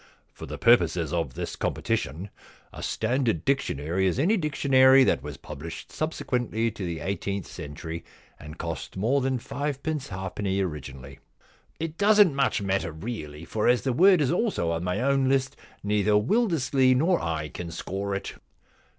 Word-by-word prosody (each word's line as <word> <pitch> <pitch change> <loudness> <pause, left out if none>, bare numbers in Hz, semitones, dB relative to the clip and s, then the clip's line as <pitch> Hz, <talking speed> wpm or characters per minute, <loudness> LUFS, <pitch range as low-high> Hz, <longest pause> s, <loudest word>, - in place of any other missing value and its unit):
* - - -41
For - - -9
the - - -6
purposes 85 - +3
of 80 -8 -2
this - - -4
competition 85 +9 -2 0.4
a - - -8
standard 115 - 0
dictionary 95 - 0
is 90 - 0
any 175 +11 +3
dictionary 135 -6 +5
that 70 - +2
was 75 0 -7
published 75 +3 -8
subsequently 125 -7 -1
to 105 -2 -7
the 85 -3 -4
eighteenth 100 +1 -3
cen 75 0 -8
tury 80 +2 -6 0.4
and 75 +1 -10
cost - - -5
more 125 +8 +2
than 130 0 0
fivepence 140 +3 -3
halfpenny 95 +1 -3
originally.' 70 -6 -5 0.3
* - - -35
It 165 0 -5
doesn't 205 -4 +6
much 135 -6 +1
matter 95 -4 -1
really, 80 -4 -7
for 105 +5 -1
as 125 0 +3
the 130 - 0
word 180 +4 +6
is 140 - +2
also 175 - 0
on 85 0 -2
my 90 +5 -1
own 135 0 +2
list 135 -1 +1 0.3
neither 105 0 +2
Wildersley 130 - +3
nor 170 +7 +3
I 80 -2 -2
can 85 +3 -7
score 100 +4 -4
it.' 95 - -5
105 Hz, 165 wpm, -26 LUFS, 85-135 Hz, 0.4 s, doesn't